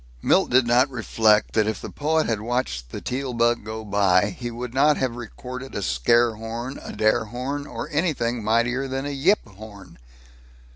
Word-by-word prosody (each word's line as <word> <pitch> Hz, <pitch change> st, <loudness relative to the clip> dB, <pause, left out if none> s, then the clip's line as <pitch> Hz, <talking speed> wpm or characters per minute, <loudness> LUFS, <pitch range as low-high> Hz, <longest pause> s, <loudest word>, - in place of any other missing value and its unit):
Milt -, -, +3 dB
did 125 Hz, 0 st, +4 dB
not 125 Hz, +3 st, +4 dB
reflect 110 Hz, -3 st, +2 dB
that 110 Hz, -1 st, +2 dB
if 110 Hz, -2 st, -2 dB
the -, -, -8 dB
poet 155 Hz, +2 st, 0 dB
had 110 Hz, -3 st, -1 dB
watched 110 Hz, -, -2 dB
the -, -, -7 dB
Teal 130 Hz, 0 st, -3 dB
bug 120 Hz, 0 st, +2 dB
go 110 Hz, +1 st, -6 dB
by, 100 Hz, -1 st, +3 dB
he 120 Hz, +5 st, -6 dB
would 120 Hz, +1 st, -6 dB
not 145 Hz, +3 st, +4 dB
have 130 Hz, -3 st, -1 dB
recorded 125 Hz, +2 st, -8 dB
a 100 Hz, -, -2 dB
scare 115 Hz, -, +3 dB
horn, 115 Hz, +4 st, -6 dB
a -, -, -8 dB
dare 110 Hz, +1 st, +2 dB
horn, 130 Hz, +6 st, -4 dB
or -, -, -6 dB
anything 130 Hz, -8 st, -1 dB
mightier 120 Hz, +5 st, +1 dB
than 135 Hz, +1 st, -3 dB
a 145 Hz, -, -3 dB
yip 150 Hz, -, +2 dB
horn. 100 Hz, -, -13 dB
120 Hz, 185 wpm, -24 LUFS, 110-130 Hz, -, did